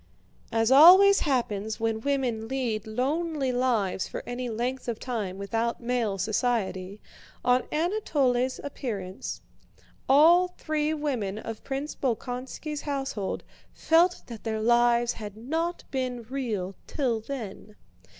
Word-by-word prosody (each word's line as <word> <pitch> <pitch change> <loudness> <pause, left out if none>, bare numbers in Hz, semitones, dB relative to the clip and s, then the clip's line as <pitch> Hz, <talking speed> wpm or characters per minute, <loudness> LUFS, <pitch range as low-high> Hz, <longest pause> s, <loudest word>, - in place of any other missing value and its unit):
As 225 +1 +2
always 370 +8 +9
happens 220 -6 -1
when 225 -1 -1
women 250 -5 -1
lead 230 -5 -2
lonely 280 +4 -1
lives 235 -7 0
for - - -6
any 245 0 -4
length 245 +4 -3
of 230 -2 -3
time 210 -7 -3
without 225 +4 -2
male 235 -4 -1
society, 205 -2 -1 0.5
on 250 0 +3
Anatole's 290 - +1
appearance 205 -9 -5 0.7
all 330 +6 +6
the 360 - -24
three 310 -1 0
women 260 -10 -2
of 220 0 -7
Prince 275 +2 -4
Bolkónski's 260 +4 -3
household 270 -9 -3 0.3
felt 345 +3 +3
that 230 -3 -9
their 220 -1 -2
life 240 +1 +3
had 210 -3 -8
not 325 +9 -2
been 255 -3 -2
real 220 -7 -3
till 250 -6 0
then. 215 -4 -7
245 Hz, 120 wpm, -27 LUFS, 220-280 Hz, 0.7 s, always